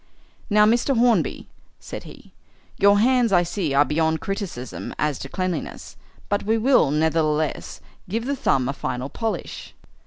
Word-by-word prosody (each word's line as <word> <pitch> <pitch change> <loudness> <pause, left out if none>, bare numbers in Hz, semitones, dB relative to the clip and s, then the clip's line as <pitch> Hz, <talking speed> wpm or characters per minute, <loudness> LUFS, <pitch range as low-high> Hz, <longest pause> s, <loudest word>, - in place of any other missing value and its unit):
"Now, 210 0 +5
Mr. 240 +4 +2
Hornby," 230 - +2 0.3
said - - -8
he, - - -14 0.5
"your 200 +1 +5
hands, 245 +1 +3
I 175 -2 +4
see, 170 -5 -2
are 145 +1 +5
beyond 160 +1 0
criticism 195 - -5
as 150 -3 -1
to 135 - -7
cleanliness, 185 +1 -4 0.3
but 205 0 0
we 220 +2 +1
will, 240 - +4
nevertheless, 155 0 0 0.3
give 225 +4 -2
the 280 +2 -1
thumb 130 - +1
a 135 - -1
final 125 -1 -4
polish." 225 +5 -5
185 Hz, 150 wpm, -23 LUFS, 150-225 Hz, 0.5 s, Now